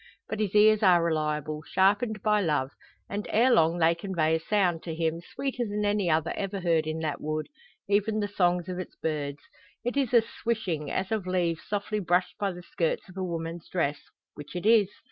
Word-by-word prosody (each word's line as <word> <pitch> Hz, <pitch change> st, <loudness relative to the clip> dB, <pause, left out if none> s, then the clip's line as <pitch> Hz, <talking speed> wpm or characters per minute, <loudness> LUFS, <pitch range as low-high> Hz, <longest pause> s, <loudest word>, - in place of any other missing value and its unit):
But 215 Hz, -, -4 dB
his 210 Hz, -2 st, -1 dB
ears 215 Hz, 0 st, +6 dB
are 180 Hz, -4 st, +5 dB
reliable, 155 Hz, -2 st, -1 dB
sharpened 205 Hz, +5 st, +1 dB
by 210 Hz, -1 st, +3 dB
love; 150 Hz, -6 st, 0 dB, 0.4 s
and, 205 Hz, +1 st, -4 dB
ere 245 Hz, +4 st, +4 dB
long 165 Hz, -5 st, +4 dB
they 165 Hz, 0 st, +4 dB
convey 170 Hz, -3 st, 0 dB
a 160 Hz, -, +2 dB
sound, 175 Hz, -2 st, +1 dB
to 165 Hz, -2 st, -5 dB
him 165 Hz, 0 st, -1 dB
sweeter 255 Hz, +6 st, -3 dB
than 210 Hz, -1 st, -2 dB
any 205 Hz, -3 st, +1 dB
other 160 Hz, 0 st, +1 dB
ever 195 Hz, 0 st, -3 dB
heard 165 Hz, -3 st, +1 dB
in 160 Hz, +1 st, -3 dB
that 155 Hz, -3 st, -3 dB
wood 155 Hz, 0 st, -2 dB, 0.4 s
even 210 Hz, +2 st, +1 dB
the 205 Hz, -, 0 dB
songs 180 Hz, -3 st, +1 dB
of 180 Hz, -1 st, -4 dB
its 185 Hz, -, -7 dB
birds. 145 Hz, -2 st, -3 dB, 0.4 s
It 245 Hz, -, -1 dB
is 275 Hz, -4 st, +1 dB
a 235 Hz, -2 st, +6 dB
swishing, 195 Hz, -12 st, -3 dB
as 190 Hz, +2 st, -2 dB
of 215 Hz, -4 st, -1 dB
leaves 175 Hz, -3 st, 0 dB
softly 210 Hz, +1 st, -2 dB
brushed 180 Hz, -1 st, 0 dB
by 200 Hz, -1 st, 0 dB
the 180 Hz, 0 st, -9 dB
skirts 170 Hz, +2 st, -2 dB
of 185 Hz, -, -13 dB
a 190 Hz, -, -2 dB
woman's 165 Hz, -1 st, -5 dB
dress 145 Hz, -5 st, 0 dB, 0.3 s
which 150 Hz, +3 st, -10 dB
it 180 Hz, -, -4 dB
is. 220 Hz, -3 st, +5 dB
180 Hz, 200 wpm, -28 LUFS, 160-210 Hz, 0.4 s, ears